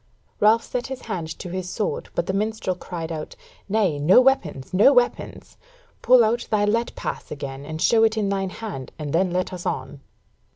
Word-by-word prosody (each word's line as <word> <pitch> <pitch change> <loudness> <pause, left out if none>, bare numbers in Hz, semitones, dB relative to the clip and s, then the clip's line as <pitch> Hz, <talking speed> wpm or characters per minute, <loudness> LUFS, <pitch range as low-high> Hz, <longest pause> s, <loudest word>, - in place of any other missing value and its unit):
Ralph 220 +2 +4
set 250 -1 -4
his 265 -1 -6
hand 180 -8 -4
to 180 - -7
his 185 0 -4
sword, 210 +2 -3
but 170 - 0
the 190 - -2
minstrel 210 -2 -1
cried 170 -2 -6
out, 155 -2 -6 0.3
"Nay, 195 -8 +1
no 170 +10 +6
weapons, 185 - +1
no 205 +9 +6
weapons! 245 -3 -1 0.4
Pull 250 -1 +6
out 235 +2 0
thy 210 -1 +2
let 230 +3 0
pass - - -5
again 140 -1 -7
and 155 0 -5
show 225 +6 +4
it 220 0 +2
in 210 -2 +1
thine 195 -1 -1
hand, 185 - -7
and 150 -3 -5
then 185 +3 +2
let 185 +1 -1
us 180 -1 -6
on." 135 +1 -4
190 Hz, 195 wpm, -23 LUFS, 160-220 Hz, 0.4 s, no